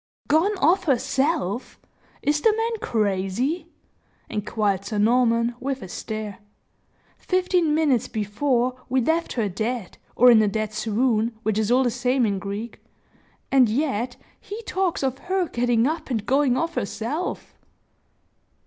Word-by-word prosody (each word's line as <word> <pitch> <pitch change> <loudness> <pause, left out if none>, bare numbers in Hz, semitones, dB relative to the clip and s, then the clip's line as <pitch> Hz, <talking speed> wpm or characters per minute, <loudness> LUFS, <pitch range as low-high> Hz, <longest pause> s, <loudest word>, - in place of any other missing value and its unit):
"Gone 350 +8 +2
off 370 +3 +3
herself! 270 - 0 0.4
Is 295 +1 +1
the 445 - +5
man 455 0 -1
crazy?" 220 - -1 0.6
inquired 210 -2 -1
Sir 210 +2 -4
Norman, 235 +2 +3
with 270 +1 -3
a - - -7
stare. 215 +2 -6 0.8
"Fifteen 365 -4 +1
minutes 290 -7 +2
before 245 +4 -1
we 260 +1 +2
left 320 +7 0
her 225 -4 0
dead, 215 +2 -4 0.2
or 250 +1 +7
in 225 -2 +6
a 215 - +3
dead 215 +1 -2
swoon, 225 +1 0
which 220 -1 0
is 215 -1 0
all 255 +2 +4
the 245 - +1
same 250 +1 +1
in 200 -2 -1
Greek, 205 +3 -6 0.7
and 260 -4 +5
yet 245 -1 -1 0.2
he 425 +3 -8
talks 375 -7 -1
of 265 0 -1
her 370 0 -1
getting 240 -2 +1
up 310 +1 -2
and 225 -5 -2
going 270 -1 +2
off 330 +2 -1
herself!" 280 - -3
245 Hz, 140 wpm, -24 LUFS, 215-300 Hz, 0.8 s, or